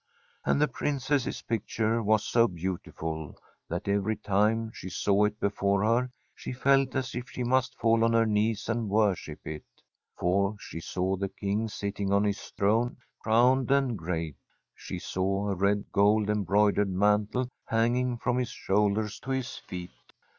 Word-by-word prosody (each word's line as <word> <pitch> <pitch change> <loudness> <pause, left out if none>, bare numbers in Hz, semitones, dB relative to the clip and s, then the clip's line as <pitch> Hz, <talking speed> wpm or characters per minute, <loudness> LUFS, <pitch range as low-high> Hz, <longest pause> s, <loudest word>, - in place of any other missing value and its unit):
And - - +2
the 150 - +4
Princess's 140 -2 -1
picture 115 +1 -1
was 110 0 +2
so 115 0 +4
beautiful 80 -4 -5 0.3
that 85 +3 -4
every 100 +2 +1
time 110 +3 +1
she 95 - -7
saw 100 +3 +2
it 105 +1 -2
before 100 0 +1
her 120 +3 +2 0.2
she - - -7
felt 135 +1 +2
as 130 -1 -2
if 125 0 -5
she 125 - -4
must 125 +1 +1
fall 115 0 +3
on 115 0 +3
her 115 0 +4
knees 110 0 0
and 115 -2 -1
worship 100 -7 0
it. 75 -1 -5 0.6
For 100 +3 +1
she 80 - -7
saw 95 +3 -1
the 100 +1 -2
King 100 +3 -2
sitting 100 -1 -3
on 100 +1 +4
his 100 -1 -1
throne, 115 +5 0 0.2
crowned 125 +4 +3
and 135 -3 +2
great; 80 -4 -3 0.4
she - - -7
saw 95 +2 -1
a - - -1
red, 100 +2 0
gold 105 +1 +3
embroidered 105 0 +2
mantle 105 +6 +1 0.2
hanging 120 +2 +1
from 125 +1 0
his 125 - -1
shoulders 105 +2 0
to 130 - -10
his 130 -2 -2
feet. 90 -1 -8
105 Hz, 160 wpm, -28 LUFS, 100-115 Hz, 0.6 s, the